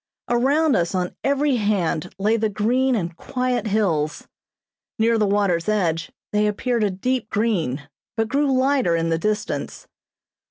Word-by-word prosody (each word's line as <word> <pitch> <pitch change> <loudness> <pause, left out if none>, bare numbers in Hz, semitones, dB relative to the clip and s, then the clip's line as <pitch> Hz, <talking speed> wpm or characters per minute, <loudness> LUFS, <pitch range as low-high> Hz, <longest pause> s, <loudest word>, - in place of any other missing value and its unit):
Around 275 +4 +3
us 170 +2 0
on 180 -1 -2
every 280 -1 +2
hand 200 -7 0
lay 210 +3 +2
the 220 -1 0
green 245 +6 +1
and 170 -5 -3
quiet 250 +3 -2
hills. 175 -8 0 0.7
Near 225 +1 +2
the 210 - +2
waters' 200 -3 +1
edge 170 -6 0 0.2
they 210 0 +3
appeared 235 +2 0
a 205 - +2
deep 225 +5 -2
green, 170 - -1 0.3
but 225 0 +1
grew 280 +3 +1
lighter 260 -8 +2
in 165 0 0
the 165 0 +1
distance. 210 +4 -3
215 Hz, 150 wpm, -22 LUFS, 180-250 Hz, 0.7 s, Around